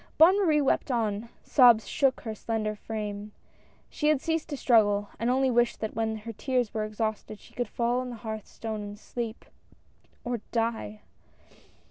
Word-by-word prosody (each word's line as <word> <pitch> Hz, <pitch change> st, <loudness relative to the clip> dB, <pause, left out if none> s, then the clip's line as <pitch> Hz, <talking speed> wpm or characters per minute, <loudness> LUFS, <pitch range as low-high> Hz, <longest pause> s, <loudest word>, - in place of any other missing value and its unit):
Bonne 360 Hz, +5 st, +7 dB
Marie 305 Hz, -4 st, +3 dB
wept 280 Hz, -, +1 dB
on; 225 Hz, -2 st, -1 dB
sobs 240 Hz, -5 st, +6 dB
shook 270 Hz, -3 st, +1 dB
her 220 Hz, -, -4 dB
slender 215 Hz, 0 st, -2 dB
frame. 210 Hz, -1 st, -5 dB, 0.5 s
She 300 Hz, -, -2 dB
had 305 Hz, -2 st, +4 dB
ceased 325 Hz, +1 st, -2 dB
to 290 Hz, -, -3 dB
struggle, 205 Hz, -5 st, +3 dB
and 230 Hz, +2 st, 0 dB
only 260 Hz, +1 st, +3 dB
wished 240 Hz, 0 st, +2 dB
that 220 Hz, -, -3 dB
when 220 Hz, 0 st, -1 dB
her 225 Hz, +1 st, -7 dB
tears 250 Hz, -1 st, -1 dB
were 215 Hz, -1 st, -1 dB
exhausted 215 Hz, 0 st, -3 dB
she -, -, -18 dB
could 245 Hz, -2 st, -2 dB
fall 240 Hz, +3 st, 0 dB
on 255 Hz, 0 st, -4 dB
the 245 Hz, -, -6 dB
hearth 220 Hz, -2 st, -6 dB
stone 220 Hz, -2 st, -5 dB
and 205 Hz, 0 st, -7 dB
sleep, 230 Hz, +1 st, -6 dB, 0.8 s
or 245 Hz, -1 st, -2 dB
die 225 Hz, -2 st, -2 dB
230 Hz, 170 wpm, -28 LUFS, 215-250 Hz, 0.8 s, Bonne